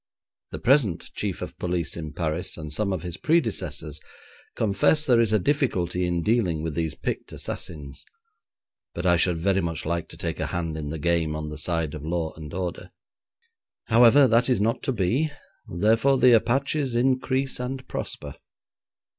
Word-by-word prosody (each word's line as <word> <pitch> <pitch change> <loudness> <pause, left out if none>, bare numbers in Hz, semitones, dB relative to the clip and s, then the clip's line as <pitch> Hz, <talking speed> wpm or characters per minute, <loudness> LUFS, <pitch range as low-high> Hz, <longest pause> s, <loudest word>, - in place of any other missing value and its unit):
The - - -6
present 120 - +2
Chief - - -3
of - - -7
Police 90 -2 -2
in 80 -3 -6
Paris 85 +2 -2
and 75 -2 -6
some 100 +4 0
of 95 -4 -3
his 90 -1 -5
predecessors 95 - -1 0.6
confess 110 +9 +2
there 120 -3 +5
is 115 -2 +2
a 110 - +4
difficulty 90 - 0
in 85 -1 -1
dealing 95 -8 +1
with 80 -2 -3
these 80 -2 -2
picked - - -4
assassins, 70 -4 -5 0.9
but 85 - -4
I 90 -1 +5
should 85 0 +3
very 95 +3 +1
much 85 -2 -3
like 85 0 -2
to - - -12
take - - -4
a - - -1
hand 85 -2 -3
in 75 -2 -4
the 80 - -4
game 80 -1 0
on 75 0 -4
the 75 - -7
side 80 -1 -1
of 75 - -7
law 80 0 -2
and 80 -2 -9
order. 90 0 -4 1.0
However, 120 +5 +7
that 120 +2 +3
is 125 - +2
not 110 +3 0
to 135 - +1
be; 125 - +1 0.4
therefore, 115 +9 +3
the 125 0 +6
Apaches 135 +3 +2
increase 130 +2 +1
and 130 +1 -5
prosper. 70 -1 -4
90 Hz, 170 wpm, -25 LUFS, 80-120 Hz, 1.0 s, However